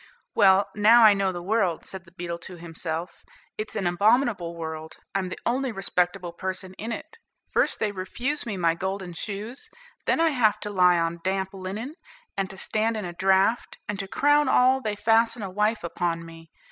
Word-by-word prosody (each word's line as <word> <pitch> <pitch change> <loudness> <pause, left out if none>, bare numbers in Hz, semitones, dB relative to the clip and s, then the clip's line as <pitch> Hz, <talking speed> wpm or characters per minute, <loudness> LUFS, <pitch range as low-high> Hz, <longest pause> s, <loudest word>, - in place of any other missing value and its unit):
"Well, 195 -1 +5
now 225 +3 +7
I 215 -2 +9
know 195 -1 +1
the 175 -1 -6
world," 190 -4 0
said 190 -2 -7
the 170 - -18
beetle 170 -1 -5
to 180 - -9
himself; 165 0 -6 0.3
"it's 215 0 -5
an 205 -4 -1
abominable 200 -1 +2
world; 160 -1 -6 0.2
I'm 190 -2 -1
the - - -6
only 255 +2 0
respectable 180 -3 -1
person 185 +1 -4
in 225 +3 -4
it. 460 - -7 0.3
First, - - +1
they 215 - 0
refuse 240 +10 -2
me 215 -5 -4
my 170 -2 +3
golden 190 0 -4
shoes; 210 +8 -5 0.4
then - - +3
I 330 0 +4
have 235 -8 +2
to 210 - -4
lie 180 -3 +5
on 165 0 -1
damp 190 0 -1
linen, 195 +8 -5 0.4
and 195 -1 -1
to 190 - -9
stand 220 +3 0
in 210 - -4
a 175 - -5
draught; 190 +5 +2
and 205 -1 -3
to 195 - -4
crown 290 +6 +3
all, 260 +1 +4
they 215 -4 -2
fasten 225 +1 +2
a 195 - -5
wife 210 +2 0
upon 170 0 -2
me. 165 0 -13
195 Hz, 190 wpm, -26 LUFS, 175-220 Hz, 0.4 s, I